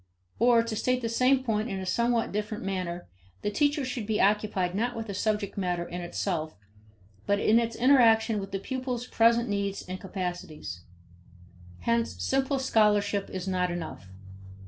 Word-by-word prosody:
Or 235 0 +5
to 230 -1 -4
state 255 +3 0
the 230 - 0
same 255 +3 +3
point 220 -1 -1
in 195 - -3
a 190 - -5
somewhat 235 +4 +1
different 210 +1 -3
manner: 180 -2 -3 0.4
the 205 - 0
teacher 290 +4 +1
should 250 -4 -4
be 215 -1 0
occupied 200 -3 +2
not 240 +5 -1
with 220 -3 -5
subject 210 -1 -1
matter 175 -2 -1
in 175 +1 -5
itself 170 -2 -3 0.7
but 200 0 +2
in 220 +3 +4
its 230 -1 -2
interaction 230 -4 +4
with 195 -1 -6
the 195 - -2
pupils' 250 +3 -4
present 235 0 +3
needs 200 -1 -2
and 185 0 -6
capacities. 175 - -5 1.0
Hence 235 0 0
simple 270 +1 0
scholarship 210 -5 +2
is 185 0 -5
not 180 -1 0
enough. 165 - -6
210 Hz, 160 wpm, -28 LUFS, 190-235 Hz, 1.0 s, Or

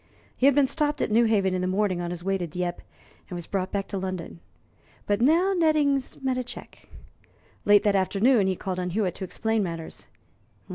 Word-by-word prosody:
He 260 - +3
had 280 - +5
been 285 -1 +5
stopped 295 +2 -1
at - - -2
Newhaven 215 -4 +3
in 185 - -1
the 185 - -1
morning 185 -1 0
on 175 - -3
his 175 -1 -6
way 195 +1 0
to 180 -2 -3
Dieppe, 175 +2 -4 0.5
and 180 - -6
was 175 -1 -6
brought 190 0 -3
back 200 -1 -2
to 195 - -3
London. 185 -3 -5 0.7
But 205 +1 0
now 335 +9 +4
Nettings 300 -6 +1
met 260 -1 0
a - - -2
check. - - -11 0.8
Late 205 0 +6
that 205 -1 +2
afternoon 200 +3 +3
he 190 - 0
called 185 0 -4
on 180 0 -2
Hewitt 185 -1 -1
to - - -7
explain 220 +4 -1
matters. 165 -4 -6
200 Hz, 200 wpm, -26 LUFS, 185-255 Hz, 0.8 s, Late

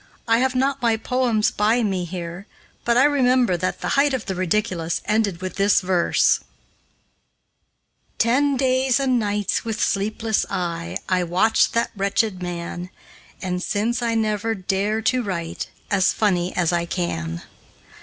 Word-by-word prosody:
I 230 0 +4
have 260 0 +1
not 270 +1 0
my 230 -2 +2
poems 235 -2 +1
by 220 +4 +2
me 190 -4 -1
here, 175 +2 -7 0.4
but 235 0 +3
I 255 - +6
remember 255 -7 +3
that 185 +2 -2
'The - - -2
Height 280 -1 +3
of 250 - -5
the 195 - -2
Ridiculous' 185 -2 -1
ended 210 -5 0
with 185 - -5
this 200 +1 +4
verse: 180 -2 +2 1.8
"Ten 275 +4 +2
days 260 0 +2
and 260 -3 +2
nights, 205 -2 -1
with 225 -2 -4
sleepless 215 +2 0
eye, 170 -2 -3
I 185 -1 +1
watched 180 +6 +2
that 230 - 0
wretched 200 0 0
man, 175 0 -5 0.5
And 180 -1 -2
since, 220 +6 -1
I 230 -1 0
never 220 0 0
dare 200 +3 -1
to 255 +3 +2
write 170 -6 -4 0.2
As 190 -2 +3
funny 185 -4 +1
as 175 -1 +1
I 170 0 0
can." 85 - -3
210 Hz, 150 wpm, -22 LUFS, 180-235 Hz, 1.8 s, I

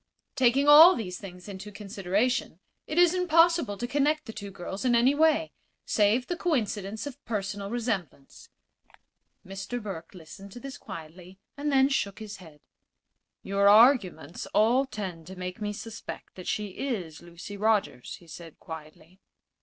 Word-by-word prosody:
Taking 265 +3 +3
all 315 +5 +10
these 180 -6 -5
things 180 -2 -11
into 200 +1 -8
consideration, 200 0 -1 0.3
it 305 - -4
is 350 -1 +6
impossible 335 - +3
to 240 - -3
connect 290 +4 +1
the 225 - -8
two 205 -2 -7
girls 190 +1 -7
in 245 -2 +3
any 245 +4 +4
way 315 +1 +2 0.3
save 215 +4 +2
the 350 - -3
coincidence 220 - -2
of 285 -3 -9
personal 200 -2 -4
resemblance." 210 - -4 1.0
Mr. 195 +6 -5
Burke 190 -6 -8
listened 180 +4 -12
to - - -9
this 270 +2 -8
quietly, 180 0 -10 0.2
and 295 +1 -2
then 270 -1 +5
shook 205 -8 -1
his 210 -2 -8
head. 160 -5 -15 0.8
"Your 200 +1 +3
arguments 210 - +4
all 245 +6 +4
tend 185 -9 -6
to 190 - -9
make 180 +2 -6
me 210 0 -2
suspect 225 +1 -8
that 185 - -10
she 210 -1 -2
is 185 - -5
Lucy 175 +4 -10
Rogers," 210 - 0
he 175 - -17
said, 165 0 -11
quietly. 160 +3 -11
205 Hz, 155 wpm, -27 LUFS, 185-255 Hz, 1.0 s, all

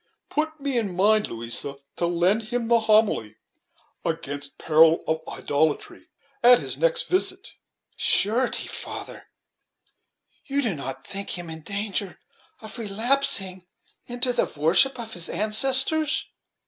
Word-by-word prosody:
Put 315 +1 -2
me 275 -3 -1
in 200 -6 -4
mind, 210 +3 +3
Louisa, 115 +4 -4 0.2
to 170 - 0
lend 180 +6 +1
him 240 -2 -2
the 235 -1 +5
homily 215 - +2 0.7
'against 145 -3 -5
peril 160 +1 +4
of 160 0 -1
idolatry,' 150 +1 -2 0.3
at 245 +1 +8
his - - -2
next - - +1
visit." 370 +1 -1 0.4
"Surety, 235 +5 +2
father, - - -7 1.2
you 280 +1 0
do 225 -6 0
not 135 -2 -6
think 200 -2 -5
him 175 -2 -7
in 160 0 -8
danger 200 +1 -4 0.4
of 220 +3 -8
relapsing 210 -4 +1 0.4
into 245 +1 +1
the - - 0
worship 190 - +4
of 225 -1 -6
his 175 -1 -4
ancestors?" 265 - +2
210 Hz, 125 wpm, -24 LUFS, 165-250 Hz, 1.2 s, at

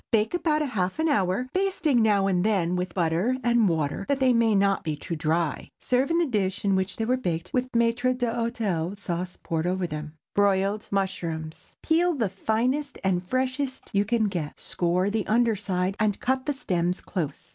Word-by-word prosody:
Bake 220 +2 +2
about 305 -4 +1
half 190 -5 -1
an 320 +1 +1
hour, 200 - +1
basting 370 -9 +2
now 205 -3 +3
and 180 -2 +1
then 185 -5 +1
with 180 -1 -3
butter 175 +7 +1
and 235 -4 +3
water, 160 +3 -1
that 280 -1 +1
they 260 -2 +4
may 230 -2 +3
not 195 0 +2
be 155 -2 -2
too 170 +3 -5
dry. 160 0 -1
Serve 255 +2 +1
in 335 - +2
the 345 - +3
dish 205 - -1
in 195 -1 +3
which 190 0 -1
they 225 - -1
were 255 +3 +2
baked, 175 -7 -3
with 255 0 0
maître 240 +2 +2
d'hôtel 230 -7 -1
sauce 180 -2 -4
poured 165 -1 -1
over 185 0 0
them. 150 -1 -6 0.2
BROILED 200 +1 +2
MUSHROOMS. 170 -5 -3
Peel 340 +1 +2
the 225 -7 0
finest 245 +9 -1
and 185 -2 +1
freshest 260 +3 -2
you 200 0 +3
can 225 +2 +1
get, 175 -8 -3
score 180 +3 0
the 215 -1 -1
under 230 0 +3
side, 190 -1 -1
and 215 -2 +1
cut 260 +1 -1
the 290 - +1
stems 180 -8 -1
close. 155 -7 -5
205 Hz, 190 wpm, -26 LUFS, 180-245 Hz, 0.2 s, they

